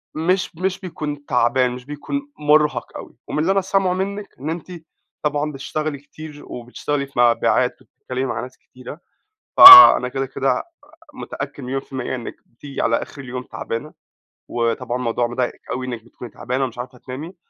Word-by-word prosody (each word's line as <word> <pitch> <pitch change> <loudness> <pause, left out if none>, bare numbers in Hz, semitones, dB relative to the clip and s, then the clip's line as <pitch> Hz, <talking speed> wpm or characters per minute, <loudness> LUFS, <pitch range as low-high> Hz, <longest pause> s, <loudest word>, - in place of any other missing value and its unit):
مش 175 +3 -1
مش 190 +3 -2
بيكون 150 -6 -6
تعبان 125 0 +1
مش 125 0 -9
بيكون 280 - -6
مرهق 150 0 +1
أوي، - - -12
ومن - - -3
اللي 165 +5 +1
أنا 195 0 +2
سامعه 190 -1 0
مِنّك 200 +2 -5
إن 145 +4 -5
أنتِ 170 +2 -6 0.5
طبعًا 150 0 -1
بتشتغلي 150 +2 -4
كتير 145 +1 -12
وبتشتغلي 140 +4 -4
في 135 - -7
مبيعات 120 -1 +2
وبتتكلّمي 130 +1 -6
مع - - -3
ناس 130 - -10
كتيرة 130 +5 -12 0.6
فَأنا 370 - +12
كده 135 +1 -3
كده 135 +1 -1 0.5
متأكّد 145 - -7
مليون 135 +2 -3
في - - -24
ال100 - - -2
إنِّك 120 -3 -7
بتيجي 135 +4 -8
على 115 - +2
آخر 140 - -9
اليوم 125 -1 -7
تعبانة، 125 +4 -6 0.5
وطبعًا 120 +1 -2
موضوع 120 -1 -1
مضايقك 120 +1 -3
أوي 130 0 -3
إنِّك 120 -3 -6
بتكوني 120 0 -12
تعبانة 130 +2 -3
ومش 125 -3 -5
عارفة 125 +1 -8
تنامي 145 +9 -9
140 Hz, 165 wpm, -20 LUFS, 125-155 Hz, 0.6 s, فَأنا